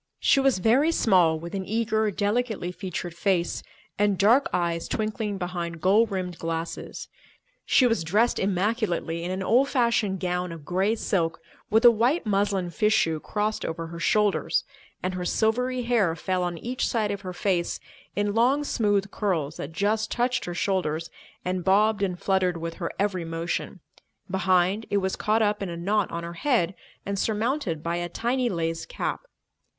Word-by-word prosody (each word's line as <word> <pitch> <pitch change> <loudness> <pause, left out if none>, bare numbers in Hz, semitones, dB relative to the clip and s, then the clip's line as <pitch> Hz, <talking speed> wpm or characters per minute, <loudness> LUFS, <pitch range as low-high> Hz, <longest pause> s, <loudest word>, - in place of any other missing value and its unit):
She 275 - +4
was 270 -4 +3
very 250 - +3
small, 180 - +4
with 170 +3 -8
an 195 -1 -2
eager, 220 +1 0
delicately 205 -1 -1
featured 180 -2 -5
face 175 0 0 0.4
and 205 -2 +2
dark 230 +9 +4
eyes 170 -2 -1
twinkling 215 -1 -2
behind 175 -2 -4
gold 205 +6 +4
rimmed 185 -3 -4
glasses. 165 0 -4 0.6
She 255 - +5
was 225 -8 +2
dressed 210 +9 +2
immaculately 190 -4 0
in 175 - -3
an 190 +1 -2
old 250 +8 +3
fashioned 235 -7 +1
gown 180 0 -2
of 165 -3 -9
grey 190 +6 +1
silk 170 -7 -1 0.3
with 220 +3 +3
a 240 - +11
white 240 +9 +1
muslin 200 -3 0
fichu 210 -7 +2
crossed 210 +1 -2
over 165 0 -4
her 170 +1 -8
shoulders, 210 +3 +2 0.4
and 185 0 -1
her 180 -1 -3
silvery 245 +6 0
hair 225 -9 +2
fell 185 +1 -1
on 175 -1 -2
each 245 +8 -2
side 215 -3 0
of 200 -1 -4
her 185 -2 -5
face 180 -1 -1 0.4
in 205 0 0
long, 255 +6 +3
smooth 205 -7 0
curls 165 -8 -1
that 145 - -6
just 210 +5 0
touched 245 0 0
her 175 - -5
shoulders 165 -4 -1 0.3
and 180 0 -1
bobbed 205 +3 +3
and 180 -3 -1
fluttered 185 -3 +1
with 165 0 -4
her 170 -3 -3
every 195 -3 0
motion; 165 +2 -4 0.5
behind, 190 +2 +2
it 205 - +1
was 190 -1 0
caught 220 +1 +1
up 205 0 0
in 195 - -3
a 170 - -5
knot 200 +3 0
on 170 0 -4
her 170 0 -6
head 225 -11 +2 0.3
and 200 0 -2
surmounted 220 - -1
by 170 +1 -1
a 175 0 -3
tiny 245 +6 0
lace 165 -3 -2
cap. - - -3
195 Hz, 170 wpm, -26 LUFS, 175-220 Hz, 0.6 s, a